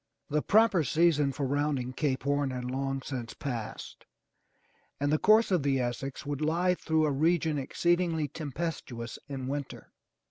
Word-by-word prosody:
The 150 +1 +2
proper 210 -4 +4
season 150 0 +3
for 140 +1 -3
rounding 140 -2 -1
Cape 135 -2 -1
Horn 145 0 +1
had 125 -1 -4
long 135 +1 -2
since 120 -5 -5
passed 120 -6 -6 0.9
and 145 +1 +1
the 155 - +3
course 215 +1 +5
of 180 -4 +3
the 135 -1 +1
Essex 130 +4 -3
would 145 0 -3
lie 170 +4 +2
through 160 -3 +1
a 150 - +1
region 155 +1 +1
exceedingly 170 +2 +1
tempestuous 145 -5 -5
in 135 -2 -4
winter. 140 0 -5
145 Hz, 150 wpm, -29 LUFS, 135-160 Hz, 0.9 s, course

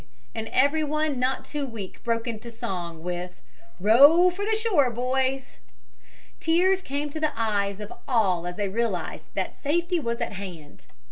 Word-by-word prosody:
and 225 0 -4
everyone 300 +1 +1
not 255 +1 0
too 295 -1 -4
weak 225 -8 -7
broke 230 0 0
into 230 0 -5
song 175 -7 -5
with 180 0 -5 0.4
"Row 285 - +7
for 385 +3 -5
the 435 +1 +2
shore, 405 - +3
boys." 260 +2 -1 0.8
Tears 370 +4 +3
came 290 -2 -3
to 315 - -5
the 310 -4 -1
eyes 200 -3 0
of 210 -1 -7
all 190 -9 +2
as 175 - -5
they 205 0 -1
realized 230 +4 -2
that - - -2
safety 345 +4 0
was 235 -5 -2
at - - -2
hand. 180 -7 -9
245 Hz, 155 wpm, -26 LUFS, 205-305 Hz, 0.8 s, Row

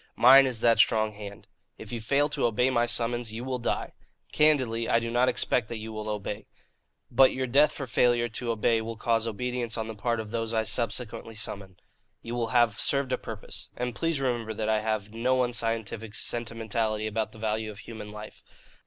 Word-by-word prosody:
Mine 135 +2 +8
is 120 -4 -1
that 115 -1 +4
strong 110 -1 +4
hand. 100 -1 -9 0.3
If 105 - -10
you 120 -2 -4
fail 140 +6 +2
to 145 -4 +1
obey 125 +3 +2
my 120 -1 +2
summons, 120 -1 -2
you 115 +2 -5
will 130 -1 -3
die. 120 - -2 0.4
Candidly, 130 -7 +3
I 115 - +4
do 115 0 -4
not 125 +2 +3
expect 120 -4 0
that 115 - -4
you 110 +1 -7
will 110 0 -5
obey. 105 0 -4 0.6
But 130 +2 +6
your 130 0 -1
death 145 +4 +4
for 140 - -5
failure 120 -1 +3
to 120 +1 -5
obey 115 0 +2
will 115 +1 -5
cause 115 0 +1
obedience 120 +1 -2
on 110 -1 -3
the 110 - -5
part 115 +2 -1
of 110 -1 -6
those 115 -1 -2
I 110 - +2
subsequently 115 0 -3
summon. 95 -2 -6 0.5
You 115 - -5
will 120 -1 -1
have 120 -3 +2
served 140 -2 +1
a - - +1
purpose. 110 -2 -7
And 125 0 -2
please 165 0 -1
remember 120 -4 -1
that 110 0 -2
I 110 -1 +3
have 110 -1 -2
no 125 +3 +2
unscientific 115 -2 -2
sentimentality 115 -2 -2
about 110 0 -2
the - - -14
value 110 0 -2
of 105 - -9
human 105 0 -9
life. 105 0 -10
115 Hz, 200 wpm, -28 LUFS, 110-125 Hz, 0.6 s, Mine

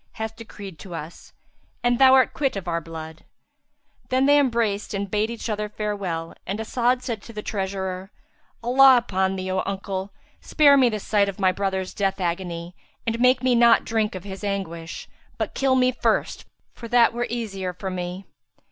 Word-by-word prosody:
hath 220 0 -5
decreed 200 -6 -10
to 175 0 -8
us; 165 +1 -9 0.5
and 245 0 +2
thou 265 -1 +8
art 260 -1 +4
quit 275 -5 0
of 195 -2 -5
our 170 -1 -1
blood." 160 0 -9 0.9
Then 260 +1 +2
they 290 +1 +6
embraced 230 -7 0
and 200 -1 -3
bade 210 +1 +1
each 235 0 -5
other 210 -1 -2
farewell, 200 -6 -3
and 200 +3 -3
As'ad 245 +3 0
said 230 -4 -4
to 230 - -12
the 210 -1 -6
treasurer, 190 -1 -3 0.5
"Allah 260 +2 +7
upon 190 -5 0
thee, 185 0 -4
O 190 - +1
uncle, 195 0 -4 0.3
spare 290 -2 +5
me 260 -3 +5
the 215 -2 -3
sight 200 0 +1
of 195 - -8
my 190 -1 +4
brother's 190 -1 -2
death 195 -1 -1
agony 175 -1 -3 0.3
and 230 0 -1
make 250 +1 +4
me 255 -1 +3
not 235 -1 +5
drink 220 -3 0
of 185 - -6
his 195 0 -8
anguish, 175 -5 -4 0.3
but - - -3
kill 270 -1 +2
me 255 0 +3
first, 250 - -1 0.3
for 235 - -9
that 235 0 +4
were 240 +1 -2
the 240 - -3
easier 195 -6 -4
for 190 +1 -6
me." 180 +1 -5
205 Hz, 185 wpm, -24 LUFS, 190-240 Hz, 0.9 s, thou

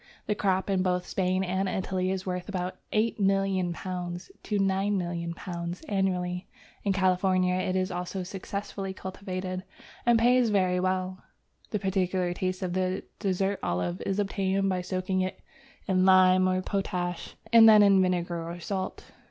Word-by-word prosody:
The 210 - +1
crop 190 -2 0
in 195 -2 +1
both 180 -1 0
Spain 185 0 0
and 190 +1 -1
Italy 185 -1 -1
is 190 0 -2
worth 180 0 -4
about 185 -2 -3
£8,000,000 190 -4 -1
to 210 - -2
£9,000,000 175 - -2
annually. 180 -2 -1 0.4
In 200 - +1
California 185 -1 +2
it 185 0 -1
is 185 +1 0
also 180 +1 -3
successfully 195 +1 -5
cultivated, 185 -1 -5 0.4
and 240 -1 +5
pays 245 +1 +4
very 185 -3 +2
well. 185 0 -1 0.5
The 210 - -1
peculiar 185 -2 0
taste 185 +1 -2
of 180 -1 -2
the 185 0 -1 0.2
dessert 195 0 0
olive 90 0 -2
is 195 - -1
obtained 195 -1 0
by 185 -1 0
soaking 185 +1 -1
it 185 0 -3 0.5
in 185 -1 +3
lime 185 0 +6
or 185 0 0
potash, 180 -3 -3 0.2
and 225 -1 +9
then 210 -1 +8
in 195 -2 +6
vinegar 175 -2 0
or 175 +1 -6
salt. 190 +1 -4
185 Hz, 145 wpm, -28 LUFS, 180-195 Hz, 0.5 s, and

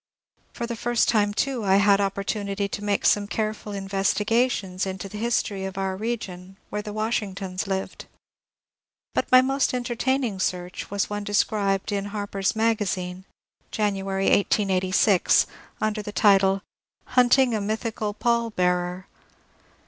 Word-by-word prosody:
For 235 - -4
the 235 0 -4
first 240 +1 +1
time 205 -3 +3
too 250 +2 -1
I 190 -1 +3
had 200 0 +5
opportunity 200 0 -2
to 205 +1 -6
make 205 -1 0
some 205 -1 +3
careful 215 0 -3
investigations 195 0 0
into 190 0 -5
the 210 +2 -8
history 215 -4 -1
of 190 0 -5
our 190 -1 -1
region, 195 -4 -5
where 210 - -2
the 210 0 -7
Washingtons 205 -3 -2
lived. 190 0 -4 1.1
But - - -1
my 255 0 +8
most 270 0 +1
entertaining 245 -2 -1
search 180 -1 -3
was 200 0 -1
one 205 0 -3
described 205 -1 0
in 200 -1 -1
^^ - - -5
Harper's 205 -1 -2
Maga 220 -1 +1
zine," 185 0 -4 0.4
January, 195 -2 -1
1886, 190 -1 +3 0.3
under 215 0 -1
the 210 - -6
title, 195 -2 +4
'^ 195 - -8 0.5
Hunting 250 0 +4
a 215 - 0
Mythical 215 0 -3
Pall 235 +1 +1
bearer." 180 -2 -1
205 Hz, 140 wpm, -25 LUFS, 195-220 Hz, 1.1 s, my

